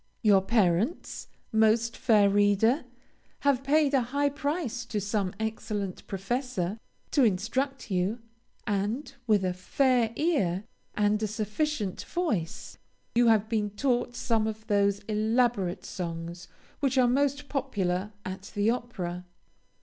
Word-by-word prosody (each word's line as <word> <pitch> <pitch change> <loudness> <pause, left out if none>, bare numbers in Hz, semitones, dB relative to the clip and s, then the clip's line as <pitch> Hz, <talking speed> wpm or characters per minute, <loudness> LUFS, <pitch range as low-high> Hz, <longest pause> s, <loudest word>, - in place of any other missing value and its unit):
Your 200 -3 +6
parents, 205 - 0 0.2
most 220 +1 +3
fair 215 -5 +4
reader, 205 +7 +3 0.6
have 275 -2 +2
paid 290 +1 +3
a 270 - +4
high 285 +4 0
price 285 -4 -2
to 215 -3 -2
some 200 -1 -1
excellent 215 -3 -3
professor, 205 -1 -2 0.3
to 280 - +4
instruct 235 +5 0
you 185 +4 +1 0.5
and, 210 +7 -2
with 205 -4 +3
a 180 - 0
fair 240 +5 +2
ear, 205 - +1 0.3
and 210 0 +2
a 215 - +1
sufficient 215 - -2
voice, 220 - -3 0.3
you 240 0 +4
have 220 -2 +4
been 215 -2 0
taught 245 +2 0
some 225 -3 +1
of 220 0 -5
those 200 -1 +2
elaborate 215 -2 0
songs 170 -1 -5 0.3
which 275 -2 +1
are 255 -1 +5
most 280 +3 +1
popular 205 -9 -1
at 190 +1 -6
the 205 +2 +3
opera. 180 -8 -4
220 Hz, 125 wpm, -28 LUFS, 200-255 Hz, 0.6 s, Your